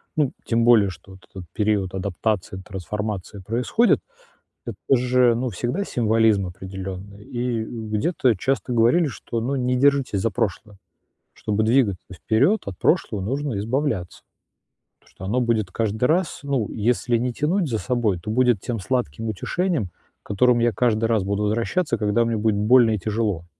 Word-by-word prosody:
Ну, 145 Hz, -4 st, +1 dB
тем 115 Hz, 0 st, +1 dB
более 115 Hz, -5 st, +5 dB
что 90 Hz, +1 st, -12 dB
вот 95 Hz, -1 st, -17 dB
этот 95 Hz, -2 st, -9 dB
период 105 Hz, -3 st, 0 dB
адаптации, 95 Hz, 0 st, -2 dB
трансформация 100 Hz, +1 st, -5 dB
происходит. 125 Hz, -, +2 dB, 0.7 s
Это -, -, -5 dB, 0.2 s
же, 125 Hz, -1 st, +3 dB
ну, 125 Hz, +1 st, -1 dB
всегда 120 Hz, -, -2 dB
символизм 110 Hz, -, +2 dB
определённый. 95 Hz, +2 st, -8 dB
И, 120 Hz, -1 st, -2 dB
э, -, -, -7 dB
где-то 115 Hz, -, 0 dB
часто 130 Hz, +4 st, -1 dB
говорили, 120 Hz, +9 st, +4 dB
что, 120 Hz, -3 st, -5 dB
ну, 135 Hz, +4 st, -1 dB
не 125 Hz, -1 st, 0 dB
держитесь 135 Hz, -6 st, +2 dB
за 115 Hz, -, +1 dB
прошлое. 105 Hz, 0 st, -3 dB, 0.6 s
Чтобы 105 Hz, 0 st, -1 dB
двигаться 110 Hz, -5 st, +2 dB
вперёд, 130 Hz, -, +1 dB
от 95 Hz, -3 st, -6 dB
прошлого 100 Hz, -3 st, +1 dB
нужно 135 Hz, +1 st, -2 dB
избавляться. 110 Hz, -4 st, -2 dB, 0.8 s
Потому -, -, -26 dB
что 95 Hz, -, -8 dB
оно 120 Hz, +6 st, 0 dB
будет 110 Hz, -5 st, 0 dB
каждый 110 Hz, +3 st, -1 dB
раз, 170 Hz, +4 st, +1 dB
ну, 135 Hz, -7 st, -1 dB
если 120 Hz, +2 st, +1 dB
не 125 Hz, +1 st, -2 dB
тянуть 165 Hz, +6 st, 0 dB
за 115 Hz, -, 0 dB
собой, 120 Hz, -8 st, 0 dB
то 105 Hz, +5 st, -8 dB
будет 120 Hz, -3 st, +3 dB
тем 115 Hz, -3 st, -3 dB
сладким 115 Hz, -, -2 dB
утешением, 160 Hz, -, -1 dB, 0.3 s
к -, -, -20 dB
которому 120 Hz, +4 st, +3 dB
я 120 Hz, -, +3 dB
каждый 115 Hz, +1 st, +1 dB
раз 110 Hz, -4 st, +1 dB
буду 100 Hz, +2 st, -1 dB
возвращаться, 115 Hz, -, 0 dB
когда 105 Hz, +3 st, +1 dB
мне 115 Hz, -1 st, -1 dB
будет 110 Hz, -1 st, +1 dB
больно 115 Hz, +2 st, +5 dB
и 105 Hz, -, 0 dB
тяжело. 105 Hz, -4 st, -2 dB
115 Hz, 165 wpm, -23 LUFS, 100-125 Hz, 0.8 s, более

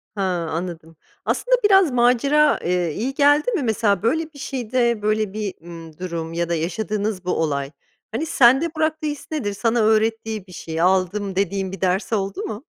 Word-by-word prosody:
Ha, 200 Hz, -, -3 dB, 0.3 s
anladım. 165 Hz, -1 st, -5 dB, 0.3 s
Aslında, -, -, +2 dB
biraz 385 Hz, -6 st, +5 dB
macera, 255 Hz, +5 st, +3 dB
eee, 175 Hz, -2 st, 0 dB
iyi 255 Hz, +5 st, -2 dB
geldi 290 Hz, -, +3 dB
mi? 380 Hz, -, -1 dB
Mesela, 215 Hz, -4 st, +1 dB
böyle, 315 Hz, +7 st, 0 dB
bir 285 Hz, -, -13 dB
şeyde, 240 Hz, -3 st, -1 dB
böyle, 215 Hz, -1 st, 0 dB
bir, 210 Hz, -3 st, -3 dB
ımm, 165 Hz, -2 st, -11 dB
durum 170 Hz, -3 st, -5 dB
ya 170 Hz, 0 st, -2 dB
da 170 Hz, -, +1 dB
yaşadığınız 200 Hz, +3 st, -2 dB
bu 180 Hz, -, 0 dB
olay, 140 Hz, -3 st, -1 dB, 0.4 s
hani, 255 Hz, +9 st, -2 dB
sende 270 Hz, +3 st, +4 dB
bıraktığı 315 Hz, 0 st, -1 dB
his 295 Hz, -1 st, -5 dB
nedir? 245 Hz, -10 st, -2 dB
Sana 230 Hz, +3 st, 0 dB
öğrettiği 220 Hz, -1 st, +1 dB
bir -, -, -14 dB
şey, 165 Hz, -2 st, -5 dB
aldım, 190 Hz, +2 st, +1 dB
dediğin 195 Hz, 0 st, -1 dB
bir 195 Hz, -, -8 dB
ders 190 Hz, +4 st, 0 dB
oldu 195 Hz, -2 st, -2 dB
mu? 215 Hz, +3 st, -6 dB
215 Hz, 175 wpm, -22 LUFS, 180-255 Hz, 0.4 s, biraz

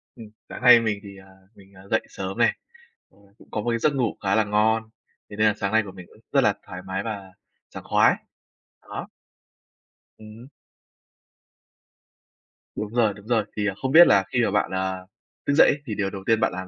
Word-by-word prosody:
Ừm, 115 Hz, -3 st, -11 dB, 0.2 s
sáng -, -, -8 dB
nay 125 Hz, -1 st, +8 dB
mình 110 Hz, -3 st, -2 dB
thì, 100 Hz, -1 st, -11 dB
à, 95 Hz, -, -15 dB, 0.3 s
mình, 100 Hz, 0 st, -19 dB
à, 95 Hz, -, -15 dB
dậy 110 Hz, -, +2 dB
sớm 95 Hz, 0 st, -6 dB
này, -, -, +2 dB, 0.5 s
ờ, -, -, -28 dB, 0.2 s
cũng -, -, -19 dB
có 105 Hz, -, -2 dB
một 120 Hz, -, -2 dB
cái 115 Hz, 0 st, 0 dB
giấc 150 Hz, +5 st, +2 dB
ngủ 120 Hz, -5 st, -1 dB
khá 100 Hz, 0 st, +1 dB
là 110 Hz, -, +3 dB
ngon. 110 Hz, +2 st, +1 dB, 0.4 s
Thế -, -, -9 dB
nên 110 Hz, 0 st, +4 dB
là 105 Hz, -, +3 dB
sáng 100 Hz, 0 st, -2 dB
nay 110 Hz, -, +4 dB
của 95 Hz, -, -8 dB
mình 95 Hz, -2 st, -12 dB
cũng -, -, -21 dB
rất -, -, +4 dB
là -, -, +3 dB
thoải 90 Hz, 0 st, -8 dB
mái 95 Hz, +1 st, -3 dB
và 100 Hz, -4 st, -7 dB, 0.4 s
sảng -, -, -10 dB
khoái. -, -, +3 dB, 0.7 s
Đó. -, -, -8 dB, 1.1 s
Ừm 110 Hz, 0 st, -13 dB
hứm. 125 Hz, +4 st, -14 dB, 2.3 s
Đúng 105 Hz, +1 st, -5 dB
rồi, 115 Hz, -4 st, +2 dB
đúng 100 Hz, +1 st, -15 dB
rồi. 115 Hz, -3 st, +1 dB
Thì, 105 Hz, -1 st, 0 dB
à, 95 Hz, -, -1 dB
không 130 Hz, -, -1 dB
biết 170 Hz, +4 st, +9 dB
là 100 Hz, -, +4 dB
khi 125 Hz, -, +2 dB
mà -, -, -1 dB
bạn, 105 Hz, -, 0 dB
à, 95 Hz, 0 st, -2 dB, 0.5 s
thức 140 Hz, -, +2 dB
dậy 145 Hz, -, +6 dB
ấy -, -, +2 dB
thì 110 Hz, -, -4 dB
điều 100 Hz, -1 st, -1 dB
đầu 95 Hz, -1 st, -8 dB
tiên 115 Hz, -1 st, +2 dB
bạn 110 Hz, -, +1 dB
làm 95 Hz, +1 st, -6 dB
105 Hz, 220 wpm, -24 LUFS, 95-115 Hz, 2.3 s, biết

